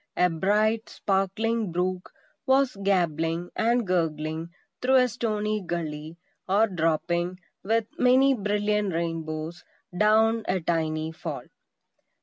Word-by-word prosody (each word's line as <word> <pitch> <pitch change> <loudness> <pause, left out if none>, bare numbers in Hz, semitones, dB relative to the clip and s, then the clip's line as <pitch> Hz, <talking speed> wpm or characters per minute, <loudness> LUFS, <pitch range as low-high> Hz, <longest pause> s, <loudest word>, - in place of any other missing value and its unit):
A 180 -1 +3
bright, 210 +6 +1
sparkling 200 +2 -1
brook 180 +1 -2 0.4
was 265 -2 +3
gabbling 170 -3 0
and 235 +1 +2
gurgling 160 -2 -1 0.3
through 260 +1 +3
a 250 -1 +6
stony 215 -2 -2
gully, 160 -2 -5 0.3
or 205 +4 +4
dropping, 175 0 -1 0.2
with 225 +3 +1
many 260 +2 +5
brilliant 210 -2 0
rainbows, 165 0 -4 0.3
down 220 +3 +3
a 185 0 +1
tiny 160 -1 -1
fall. 160 - -6
185 Hz, 110 wpm, -26 LUFS, 165-220 Hz, 0.4 s, a